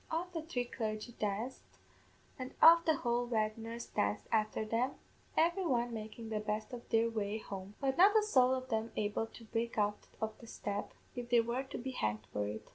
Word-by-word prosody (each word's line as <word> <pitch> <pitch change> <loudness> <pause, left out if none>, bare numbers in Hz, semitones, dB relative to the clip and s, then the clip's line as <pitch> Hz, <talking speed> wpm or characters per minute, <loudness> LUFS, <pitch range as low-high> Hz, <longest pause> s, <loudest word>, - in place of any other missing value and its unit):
Off 350 +3 -2
the 325 - -2
three 285 -6 -2
clargy 220 0 -4
danced, 215 +5 -2 0.8
and 255 0 -6
off 335 +1 +9
the 315 - +4
whole 240 -2 0
weddiners 225 +1 -2
danced 100 0 0
afther 215 0 +1
them, 235 +5 +1 0.4
every 345 +4 +3
one 240 -7 +1
makin' 220 +1 -6
the 215 - 0
best 215 +2 -3
of 240 -1 -8
their 225 0 +4
way 215 -2 -1
home; 200 -1 -7
but 270 -1 0
not 405 +4 +8
a 430 - +5
sowl 260 -12 +5
of 255 0 -5
them 225 -1 -1
able 210 +1 0
to 230 - -13
break 230 +1 -2
out 205 0 0
of 220 0 -2
the 230 - -12
step, 205 -2 -4 0.2
if 245 -1 -5
they 240 -1 +6
were 235 +3 0
to 270 - -7
be 260 +2 -4
hanged 105 - -1
for 105 0 0
it. 105 +1 -6
230 Hz, 200 wpm, -34 LUFS, 215-255 Hz, 0.8 s, off